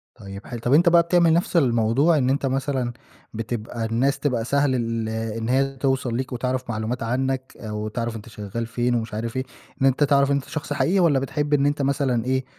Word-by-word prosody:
طيب 100 -2 -10
ح 120 - -6
طَب 120 +3 0
أنت 170 +3 +6
بقى 170 0 +6
بتعمل 170 -1 +3
نَفْس 170 +1 +1
الموضوع 130 +4 +3
إن 130 -2 +1
أنت 140 +1 0
مثلًاً 135 -2 -1 0.4
بتبقى 115 0 -4
الناس 125 +5 +1
تبقى 125 -6 -1
سهل 140 0 +2
ال 115 -2 -2
إن 110 +1 -3
هي 135 +1 +1
توصل 130 -3 0
ليك 130 0 -4
وتعرف 125 +1 -2
معلومات 115 +2 -3
عنّك 130 +2 -2
أو 105 -1 -4
تعرف 115 +1 -3
أنت 110 +1 -9
شغّال 105 +2 -5
فين 120 +1 0
ومش 115 -2 -3
عارف 115 +3 -4
إيه، 130 - 0 0.4
إن - - +4
أنت 135 +3 +2
تعرف 140 -1 +3
أنت 140 -1 0
شخص 150 -2 -4
حقيقي 185 +6 +2
والّا 155 -6 +4
بتحب 145 +2 -2
إن 140 -1 +3
أنت 145 0 +1
مثلًاً 135 -4 0
إيه، 130 0 0
130 Hz, 205 wpm, -23 LUFS, 115-140 Hz, 0.4 s, أنت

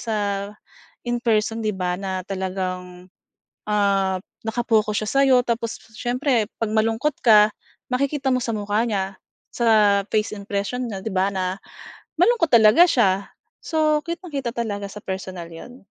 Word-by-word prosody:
sa 225 -2 -2 0.9
in 240 0 -1
person 225 -1 +1
'di 215 -3 -2
ba 180 -1 -1
na 190 -2 -3
talagang, 185 -1 -5 0.6
ah, 195 -3 +1 0.2
naka-focus 220 -2 +1
siya - - -5
sa'yo 270 0 +4
tapos 230 -1 -2 0.2
siyempre 245 -1 +1 0.2
'pag 225 - 0
malungkot 225 +6 +1
ka 210 -2 +7 0.4
makikita 275 +1 0
mo 255 - +1
sa 235 - -3
mukha 205 +1 0
niya, 195 -2 -2 0.4
sa 210 -4 +4
face 215 0 0
expression 205 +5 -3
niya 200 -4 -5
'di 220 - -3
ba 190 +1 +2
na 185 0 -3 0.6
malungkot 365 -3 +4
talaga 225 +7 +7
siya. 200 - +2 0.4
So, 310 -2 +1
kitang-kita 320 -8 -4
talaga 205 -4 -3
sa 210 - -9
personal 185 -2 -5
yun. 245 +10 -12
215 Hz, 140 wpm, -22 LUFS, 195-245 Hz, 0.9 s, ka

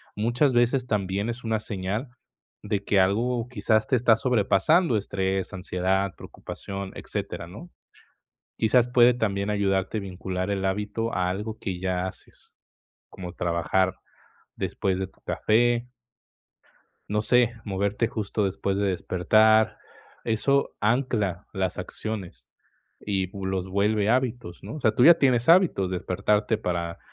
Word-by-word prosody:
muchas 120 +6 +1
veces 120 +1 +2
también 100 0 -1
es 120 +1 -5
una 110 -1 0
señal 105 +5 -4 0.5
de 105 -1 -2
que 100 -1 +2
algo 115 +5 +1
quizás 110 -1 +1
te 130 - +2
está 120 -1 +4
sobrepasando, 125 - +2
estrés, 95 -1 -2
ansiedad, 95 +1 -1
preocupación, 100 -1 -7
etcétera - - -5
¿no? 115 - -11 0.9
Quizás 120 +2 +3
puede 125 0 +6
también 100 -4 -1
ayudarte 100 0 0
vincular 95 0 -4
el 95 -1 -2
hábito 105 +4 -2
a 90 -1 0
algo 105 +4 -4
que 95 -2 -4
ya 90 0 -1
haces - - -14 0.5
como 90 -1 -8
trabajar 90 +2 0 0.6
después 95 -1 -1
de 95 0 -3
tu - - -28
café 120 +2 +1 1.2
No 105 +1 0
sé, 125 0 +3
moverte 100 +3 0
justo 105 -2 -2
después 95 0 -2
de 100 -1 +1
despertar, 110 +5 +3 0.5
eso 140 +5 +1
ancla 105 -5 0
las 95 -2 -2
acciones 105 -5 -6 0.5
y 95 -2 -1
pues 95 0 -5
los 95 -1 -2
vuelve 105 +2 +1
hábitos, 120 -7 -1
¿no?, - - -7
o 155 - -7
sea, 110 - +3
tú 120 - +4
ya 170 +1 +9
tienes 125 -4 +2
hábitos, 165 - +4
despertarte 100 +4 0
para 85 -4 -3
105 Hz, 135 wpm, -25 LUFS, 95-115 Hz, 1.2 s, ya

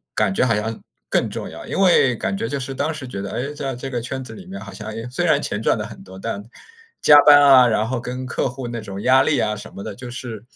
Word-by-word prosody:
感 105 -3 +2
觉 110 - +2
好 110 - +2
像 110 +1 -3 0.3
更 - - +1
重 - - -6
要。 - - -10
因 - - -3
为 175 -10 +4
感 195 - -2
觉 230 - -2
就 140 - -2
是 135 +1 -4
当 145 +4 -1
时 150 -4 -6
觉 100 -6 -6
得， 100 - -5
诶， 140 +4 -3
在 140 -3 -4
这 130 +2 -6
个 120 -2 -3
圈 130 +2 -4
子 125 - -8
里 190 - -11
面 195 +1 -7
好 - - -10
像， 110 - -8
哎， 115 +2 -6
虽 125 - -1
然 - - +3
钱 - - -3
赚 - - +2
得 - - -4
很 - - -11
多， 95 0 -12
但 105 -1 -4 0.6
加 150 - +8
班 145 -1 +9
啊 135 -3 +7
然 110 -1 +1
后 125 +1 -2
跟 125 +1 -5
客 125 - -1
户 125 0 -6
那 120 0 -4
种 100 -1 -7
压 130 +1 +5
力 150 0 +1
啊 105 - 0
什 105 +2 -9
么 100 - -7
的， - - -6
就 125 0 -8
是 120 -3 -7
125 Hz, 305 characters per minute, -21 LUFS, 110-135 Hz, 0.6 s, 班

